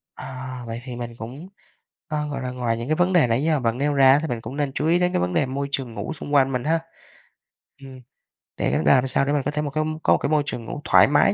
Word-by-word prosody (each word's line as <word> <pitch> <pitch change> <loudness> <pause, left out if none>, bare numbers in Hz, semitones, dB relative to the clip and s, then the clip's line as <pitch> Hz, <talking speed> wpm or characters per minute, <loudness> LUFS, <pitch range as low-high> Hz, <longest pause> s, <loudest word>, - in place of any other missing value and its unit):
À, 130 -1 -7
vậy 115 +1 -5
thì 125 -2 -7
mình 120 -1 -6
cũng, 130 +10 -8 0.6
ờ, 150 -1 -2
gọi 140 -2 -4
là, 125 0 -3
ngoài 120 -2 -1
những 115 +2 -5
cái 155 - +1
vấn 180 +3 +2
đề 165 -8 +5
nãy 115 +4 +1
giờ 155 -2 +2
bạn 115 -2 -1
nêu 145 +2 0
ra 135 0 +6
thì 160 - -3
mình 120 -5 -3
cũng 135 - -7
nên 145 -2 -1
chú 150 +3 -1
ý 170 +2 +3
đến 180 0 +1
cái - - +1
vấn 90 +1 -1
đề 135 - +2
môi 140 +2 -3
trường 130 -4 -2
ngủ 160 - -4
xung 145 -1 -7
quanh 135 -2 +4
mình 125 -2 -2
ha. 165 +3 +1 1.0
Ừm, 130 -1 -11 0.6
để - - 0
ra 75 - +6
làm 130 +1 +2
sao 135 - +1
để 145 - 0
mình 145 - +1
có 145 - 0
thể 150 0 -2
mà 150 - -2
có 155 +2 -1 0.2
có - - +3
một - - +4
cái - - -2
môi 150 -1 +2
trường 120 -5 -5
ngủ 145 - -6
thoải - - +6
mái 145 +7 +4
135 Hz, 285 wpm, -23 LUFS, 125-150 Hz, 1.0 s, ra